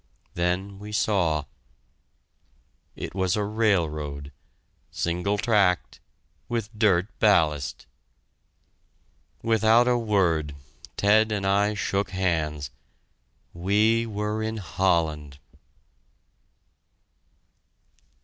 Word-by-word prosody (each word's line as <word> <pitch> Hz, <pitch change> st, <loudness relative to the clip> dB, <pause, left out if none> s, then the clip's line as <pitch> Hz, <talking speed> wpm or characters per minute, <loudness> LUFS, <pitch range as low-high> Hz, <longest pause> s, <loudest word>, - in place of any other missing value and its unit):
Then 90 Hz, +3 st, -2 dB
we 105 Hz, +1 st, -9 dB
saw 90 Hz, -7 st, +1 dB, 1.5 s
It -, -, -6 dB
was 95 Hz, -1 st, 0 dB
a 105 Hz, -, 0 dB
railroad, 80 Hz, -10 st, -1 dB, 0.6 s
single 90 Hz, +4 st, -1 dB
tracked, 100 Hz, -5 st, +1 dB, 0.5 s
with 115 Hz, -2 st, -3 dB
dirt 100 Hz, -5 st, +3 dB
ballast! 80 Hz, -, +2 dB, 1.6 s
Without 115 Hz, +1 st, +4 dB
a 125 Hz, -1 st, +2 dB
word, 85 Hz, -10 st, 0 dB, 0.4 s
Ted 110 Hz, +2 st, +3 dB
and 100 Hz, -2 st, -2 dB
I 100 Hz, +2 st, +2 dB
shook 100 Hz, 0 st, -1 dB
hands! 80 Hz, -6 st, -2 dB, 0.8 s
We 105 Hz, +6 st, +2 dB
were 105 Hz, 0 st, -3 dB
in 110 Hz, 0 st, -3 dB
Holland! 80 Hz, -6 st, -1 dB
100 Hz, 80 wpm, -25 LUFS, 85-105 Hz, 1.6 s, Without